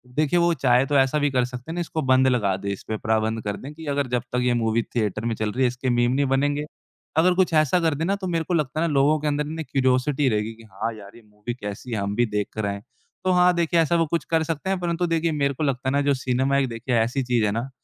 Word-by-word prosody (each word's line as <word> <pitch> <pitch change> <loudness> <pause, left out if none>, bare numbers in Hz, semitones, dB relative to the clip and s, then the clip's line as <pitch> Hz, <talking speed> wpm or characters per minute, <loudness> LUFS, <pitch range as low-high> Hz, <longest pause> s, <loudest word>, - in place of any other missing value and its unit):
देखिए 155 +3 +2
वो 170 0 +3
चाहे 125 -3 +3
तो 145 - -1
ऐसा 135 +2 +3
भी 145 0 +2
कर 125 -2 +2
सकते 125 +5 -8
हैं - - -4
ना 175 - -2
इसको 160 -1 -3
बंद 130 -1 +4
लगा 105 -7 +2
दे, 100 +1 -5
इसपे 110 +3 -5
प्राबंध 110 +1 0
कर 105 -1 -3
दें 145 +3 -9
कि 160 +1 -11
अगर 140 -1 0
जब 125 -1 0
तक 125 - +1
ये 125 -1 +2
मूवी 115 -1 +1
थिएटर 110 -1 -1
में 115 - 0
चल 110 -1 -2
रही 130 +3 0
है, - - +5
इसके 125 +1 -3
मीम 120 0 +2
नहीं 140 +2 +1
बनेंगे। 145 +2 0 0.5
अगर 180 +3 +5
कुछ 185 -3 +2
ऐसा 155 +3 +3
कर 160 -3 +1
दे 160 - -3
ना 200 +2 +1
तो 190 -2 -5
मेरे 165 -2 0
को 175 - -3
लगता 155 -1 0
है 170 - +2
ना 150 - -2
लोगों 145 +3 +3
के 150 - -3
अंदर 150 0 0 0.2
क्यूरियोसिटी 130 +1 +1
रहेगी 105 +1 -1
कि 115 - -16
हाँ, 105 +4 -3
यार 100 0 -13
ये 120 - -14
मूवी 105 +3 -7
कैसी 105 +1 -7
है, 110 - -1
हम 100 0 -2
भी 120 - +3
देख 105 -2 -2
कर 110 -1 -3
आए। 100 0 -3 0.4
तो 185 - +2
हाँ, 180 0 +5
देखिए 170 0 +2
ऐसा 165 +1 +2
वो 165 -1 +3
कुछ 170 +2 -2
कर 160 -1 +3
सकते 165 +3 -3
हैं 190 -1 0
परंतु 175 0 -1
देखिए 165 0 0
मेरे 140 -2 0
को 150 - -4
लगता 130 -2 -1
है - - 0
ना 140 - +2
जो 140 0 +2
सिनेमा 130 +1 0
है 140 -1 +3
देखिए 120 +1 -3
ऐसी 125 +4 0
चीज़ 120 -3 +1
है 100 - +1
ना, 115 +5 -3
135 Hz, 290 wpm, -24 LUFS, 115-155 Hz, 0.5 s, है